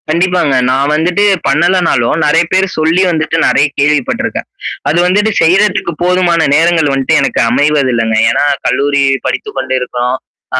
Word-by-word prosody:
கண்டிப்பாங்க. 170 -2 0 0.2
நான் 135 +3 0
வந்துட்டு 175 +6 0 0.2
பண்ணலனாலும் 170 -7 +1
நெறைய 165 +3 +2
பேர் 190 +1 +2
சொல்லி 160 +3 +1
வந்துட்டு 160 -1 -2
நெறைய 140 - +2
கேள்விப்பட்டருக்கேன். 145 -2 -1 0.4
அது 155 - 0
வந்துட்டு 205 +4 +1
செய்றதுக்கு 180 +2 +1
போதுமான 180 -1 +1 0.2
நேரங்கள் 165 -2 +2
வந்துட்டு 135 +4 +1
எனக்கு 135 - -1
அமைவதில்லங்க. 130 -4 0
ஏன்னா, - - 0 0.2
கல்லூரி 140 +1 0 0.2
படித்துக்க - - -4
கொண்டு 130 0 -2
இருக்கிறோம். 125 0 -3 0.4
ஆ - - +1
155 Hz, 135 wpm, -12 LUFS, 135-175 Hz, 0.4 s, நெறைய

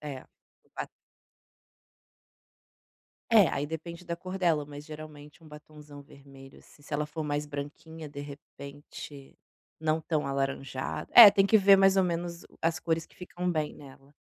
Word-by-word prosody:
É, 140 -4 -7 0.5
o - - -34
batom. - - -5 2.4
É, 215 -6 +7
aí 145 - -2
depende 170 +3 -7
da 170 - -3
cor 185 +2 -7
dela 165 -5 +1
mas 145 0 -11
geralmente 155 0 -11
um 155 - -14
batonzão 150 -1 -13
vermelho, 135 -1 -16
assim, - - -21
se 150 - -7
ela 150 +1 0
for 155 +2 -6
mais 145 0 -2
branquinha 150 +2 -8
de 145 0 -8
repente, 145 0 -11 0.4
não 160 0 0
tão 155 -2 -2
alaranjada, 135 -1 -3
é 225 -4 +12
tem 195 0 +3
que 220 - +5
ver 195 0 +7
mais 195 0 +4
ou - - +5
menos 170 0 -4
o - - -20
as 165 0 0
cores 165 -1 -1
que - - -23
ficam 180 0 -4
bem 155 -2 -2
nela. 140 0 -16
150 Hz, 165 wpm, -28 LUFS, 145-170 Hz, 2.4 s, é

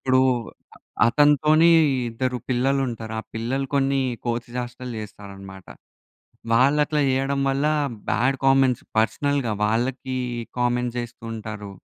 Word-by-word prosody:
ఇప్పుడు 130 - +6 0.9
అతనితోని 150 +5 +4 0.4
ఇద్దరు 125 +2 -2
పిల్లలు 135 +2 +1
ఉంటారు. 110 -2 -6
ఆ - - -11
పిల్లలు 130 +5 -2
కొన్ని 135 0 +2 0.3
కోతి 120 0 -2
చేస్టలు 125 0 -5
చేస్తారన్నమాట. 100 -2 -11 0.9
వాళ్ళు 130 +6 +4
అట్లా 150 0 0
చేయడం 135 +1 0
వల్ల 135 +2 0 0.4
బాడ్ 130 +4 +1
కామెంట్స్ 135 -2 +3
పర్సనల్‌గా 120 +3 +1
వాళ్ళకి 125 +4 -1 0.4
కామెంట్స్ 125 0 0
చేస్తూ 120 0 -8
ఉంటారు. 105 -2 -7
125 Hz, 110 wpm, -23 LUFS, 115-135 Hz, 0.9 s, ఇప్పుడు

